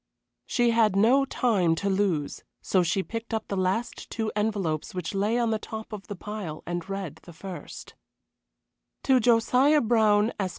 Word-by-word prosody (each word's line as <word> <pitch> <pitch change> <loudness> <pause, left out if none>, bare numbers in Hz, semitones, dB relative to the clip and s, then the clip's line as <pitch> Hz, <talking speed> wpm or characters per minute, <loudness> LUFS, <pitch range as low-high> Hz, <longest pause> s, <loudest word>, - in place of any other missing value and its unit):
She 240 -1 +2
had 220 -4 +3
no 245 +7 +4
time 200 -11 +1
to 200 - -3
lose, 190 -7 0 0.2
so 185 - +1
she 175 +3 0
picked 230 +1 -5
up 220 - -4
the 200 - -2
last 190 +5 -2
two 220 -1 -2
envelopes 200 -8 -1
which 180 0 -4
lay 205 +4 +1
on 235 -2 +1
the 220 - 0
top 220 0 -8
of 200 -2 -8
the 205 - -5
pile 195 -6 -6
and 175 +1 -4
read 195 -5 -5
the 175 - -13
first: 180 +2 -9 1.1
To 260 -1 +4
Josiah 250 +5 +4
Brown, 220 -2 +3
Esq. 190 -2 0
210 Hz, 170 wpm, -26 LUFS, 185-230 Hz, 1.1 s, no